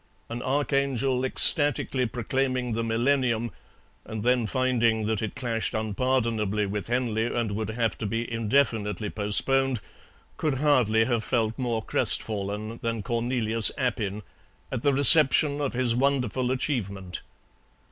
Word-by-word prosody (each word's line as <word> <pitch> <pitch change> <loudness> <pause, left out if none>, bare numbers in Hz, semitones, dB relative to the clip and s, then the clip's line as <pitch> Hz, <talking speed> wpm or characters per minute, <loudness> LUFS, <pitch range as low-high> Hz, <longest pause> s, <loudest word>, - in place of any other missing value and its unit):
An 120 +1 -5
archangel 135 -2 0
ecstatically 135 -2 +2
proclaiming 130 +1 -2
the 115 +1 -2
Millennium, 120 0 0 0.5
and 110 -1 -6
then 125 -2 +1
finding 120 -3 +1
that 110 -1 -1
it 110 - -4
clashed 115 -5 -3
unpardonably 110 -2 -1
with 100 +1 -4
Henley 120 -2 -1
and 120 -3 -2
would 110 +2 -3
have 115 -1 -1
to 110 - -3
be 115 +3 -2
indefinitely 110 -3 0
postponed, 130 +5 +2 0.6
could 150 -3 -1
hardly 125 -6 +2
have 120 -2 -1
felt 115 -3 0
more 120 -4 -2
crestfallen 105 +2 -1
than 115 -2 -3
Cornelius 115 -1 0
Appin 105 -6 -2 0.5
at - - -3
the 145 - +2
reception 145 +1 +6
of 140 - -2
his 125 -1 +1
wonderful 130 -1 0
achievement. 100 - -3
115 Hz, 125 wpm, -26 LUFS, 110-130 Hz, 0.6 s, reception